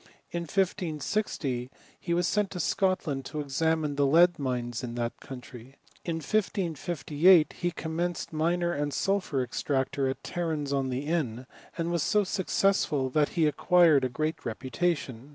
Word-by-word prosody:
In 170 0 -2
1560 165 - -1 0.3
he 170 - -2
was 175 0 +1
sent 210 -1 +1
to 180 - -6
Scot 185 +2 +1
land 135 -4 -2
to 150 - -5
examine 150 +1 0
the 140 -1 +3
lead 175 +4 +5
mines 125 -3 -2
in 120 -1 -5
that 120 -1 -3
country. 125 0 -10 0.3
la 170 - 0
1558 170 -2 +2
he 175 - +1
commenced 170 0 -3
miner 170 +2 +1
and 145 -2 -1
sulphur 190 -9 0
extractor 135 +2 -1
at 130 - -5
Tarenz 155 -5 -2
on 135 -1 0
the 130 +3 -3
Inn, 135 -7 -1 0.3
and 170 0 -1
was 170 -2 0
so 210 +6 +2
successful, 185 -8 +1
that 150 +1 +2
he' 165 - +4
acquired 160 -2 +4
a 130 - +1
great 155 +6 -3
reputation. 130 +1 -2
155 Hz, 150 wpm, -28 LUFS, 135-175 Hz, 0.3 s, lead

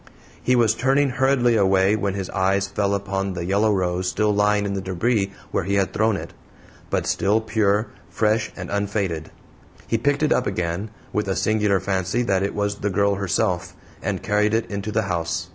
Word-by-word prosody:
He 125 - +2
was 115 -3 +4
turning 135 +4 +2
hurriedly 125 -2 +2
away 95 0 +3
when 100 -2 -1
his 95 -2 -3
eyes 95 0 +1
fell 100 +1 0
upon 100 -1 -2
the 85 -1 -4
yellow 100 +4 +2
rose 90 -2 0
still 105 +2 +1
lying 105 0 +2
in 100 - -2
the 95 - -2
debris 95 +2 0 0.2
where - - 0
he 100 +1 0
had 100 -1 +1
thrown 110 -1 +2
it - - -8 0.6
but - - 0
still 105 +3 +2
pure, 110 -1 +1 0.2
fresh, 110 0 +1
and - - -7
unfaded. 100 -6 -2 0.6
He 115 - 0
picked 145 +5 +1
it 155 - +4
up 125 - 0
again, 90 +2 -2 0.2
with 105 -1 0
a 95 - 0
singular 105 -2 +2
fancy 95 +5 -1
that 95 -5 +1
it 100 - -2
was 100 0 -1
the 105 - -1
girl 100 +1 +2
herself, 100 -3 -1 0.3
and - - -3
carried 105 +1 +2
it 115 - 0
into 100 +1 -3
the 110 +1 +1
house. 85 -1 -2
100 Hz, 195 wpm, -23 LUFS, 95-110 Hz, 0.6 s, was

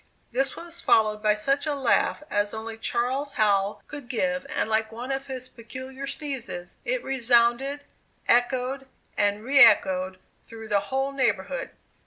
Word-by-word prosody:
This 270 +2 +1
was 340 0 -8
followed 215 -1 +3
by 210 -1 +3
such 275 +8 0
a 295 - 0
laugh 270 +2 +1
as 205 +1 0
only 220 0 -6
Charles 255 +5 -2
Howell 200 -1 +1
could 290 -5 -9
give, 270 +3 -1
and 300 -6 -1
like 220 0 0
one 240 +4 -6
of 270 0 -3
his 255 -1 -5
peculiar 260 +3 -8
sneezes, 265 - -5
it - - -1
resounded, 250 +2 +2 0.5
echoed, 255 +2 +1 0.3
and 205 +1 +1
re 275 +3 +3
echoed 190 -4 +4 0.3
through 225 -1 -11
the 205 -1 +3
whole 270 +1 0
neighborhood. 280 - -1
250 Hz, 150 wpm, -26 LUFS, 220-275 Hz, 0.5 s, echoed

